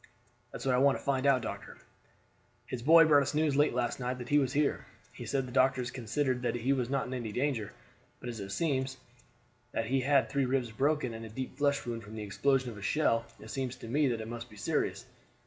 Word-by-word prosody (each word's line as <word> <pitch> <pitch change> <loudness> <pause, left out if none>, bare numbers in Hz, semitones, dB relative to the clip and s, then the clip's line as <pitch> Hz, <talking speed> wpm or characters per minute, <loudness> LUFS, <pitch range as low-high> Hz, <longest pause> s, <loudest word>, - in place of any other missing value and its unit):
"That's - - -7
want 130 -2 +3
I - - +3
want 140 0 +4
to - - -12
find 140 0 +1
out, 130 -3 +4
doctor. - - -6 0.9
His 120 0 -5
boy 165 +5 +7
brought 145 -2 +6
us 140 - -2
news 150 -2 +2
late 145 -3 +3
last 125 +1 -1
night 125 0 -2
that 120 -1 -8
he 145 - +5
was 135 -2 0
here. 145 0 0 0.3
He - - -8
said 135 -2 0
the 125 - -9
doctors 130 -1 +2
considered 130 +1 -1
that 120 -1 -1
he 125 +3 +1
was 125 -3 -1
not 135 0 0
in 130 - -6
any 120 -4 -4
danger; 125 -3 -1 0.5
but - - -8
as 115 -2 -5
it 100 -1 -6
seems 135 0 -1 0.8
that 115 - -1
he 130 +3 +1
had 140 +2 +3
three 140 -1 0
ribs 125 -3 0
broken 135 +1 0
and 115 0 -7
a 110 - -7
deep 130 +4 -6
flesh 140 -2 +1
wound 115 -1 -4
from 110 0 -10
the 110 - -5
explosion 130 +4 +1
of 105 - -10
a - - -11
shell, 115 -1 +1
it 110 - -10
seems 130 -2 -3
to 125 -2 -10
me 145 +5 +2
that 115 -3 -1
it 110 - -6
must 120 +1 -7
be 105 - -14
serious." 100 - -1
130 Hz, 240 wpm, -31 LUFS, 115-140 Hz, 0.9 s, boy